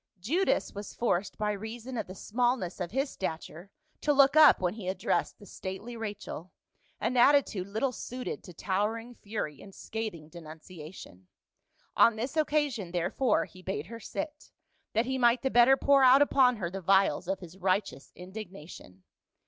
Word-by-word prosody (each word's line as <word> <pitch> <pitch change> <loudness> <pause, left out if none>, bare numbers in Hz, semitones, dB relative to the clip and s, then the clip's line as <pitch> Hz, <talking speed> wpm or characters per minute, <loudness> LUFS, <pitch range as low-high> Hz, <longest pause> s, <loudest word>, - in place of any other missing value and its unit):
Judas 325 - 0
was 205 0 -8
forced 200 -5 -1
by 210 0 0
reason 225 +5 -6
of 220 - -3
the 185 - -9
smallness 240 -4 -1
of 180 -2 -3
his 270 +6 -1
stature 170 0 -6 0.3
to 295 - +2
look 275 0 +5
up 310 -3 +8
when 180 -1 0
he 215 -4 -8
addressed 185 0 -1
the 205 - -14
stately 195 +5 -7
Rachel, 205 -5 -6 0.5
an 230 +4 -1
attitude 245 -7 +4
little 220 +6 -1
suited 250 +1 -6
to 180 - -10
towering 215 +6 -2
fury 200 - -5
and 195 -1 -13
scathing 215 -9 -5
denunciation; 155 - -11 0.7
on 230 - +5
this 240 +6 -4
occasion 290 - 0
therefore, 195 +7 +1
he 185 - -15
bade 180 -5 -4
her 230 +5 -9
sit, 300 +6 -6 0.4
that 225 +2 +2
he 265 +1 -2
might 240 +1 +3
the 265 - 0
better 245 +3 +6
pour 275 -1 +4
out 260 +2 +8
upon 260 -3 +4
her 175 -6 -4
the 195 +1 -5
vials 195 0 +3
of 190 0 -1
his 180 +1 -12
righteous 185 -5 -1
indignation. 180 - -10
210 Hz, 165 wpm, -29 LUFS, 185-250 Hz, 0.7 s, up